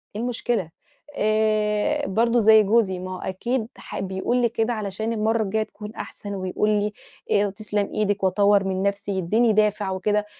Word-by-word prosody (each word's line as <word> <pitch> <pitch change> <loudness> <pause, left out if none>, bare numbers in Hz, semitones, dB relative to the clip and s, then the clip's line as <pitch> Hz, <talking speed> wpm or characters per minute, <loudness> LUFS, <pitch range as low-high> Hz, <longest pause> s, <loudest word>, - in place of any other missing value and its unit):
إيه 215 - -3
المشكلة؟ 235 -6 -1 0.5
آآ 215 +5 +1
برضه 235 +4 +2
زي 220 0 +7
جوزي، 200 -3 +2
ما 185 +1 -6
هو - - -8
أكيد 220 +6 -2
ح - - -7
بيقول 190 +5 -1
لي 240 -1 +2
كده 225 +1 -1
علشان 215 +1 -3
المرة 220 +1 +1
الجاية 215 +2 0
تكون 210 0 -10
أحسن، 205 -1 -6
ويقول 190 +2 -1
لي 210 0 +1 0.4
آآ، 205 0 +3
تِسْلَمْ 205 0 -2
إيدِك، 205 -1 0
وأطوِّر 200 +1 +4
من 190 0 -2
نفسي، 200 0 -1
يديني 215 +5 +2
دافع 210 -2 +1
وكده. 205 +2 0
210 Hz, 165 wpm, -23 LUFS, 195-220 Hz, 0.5 s, زي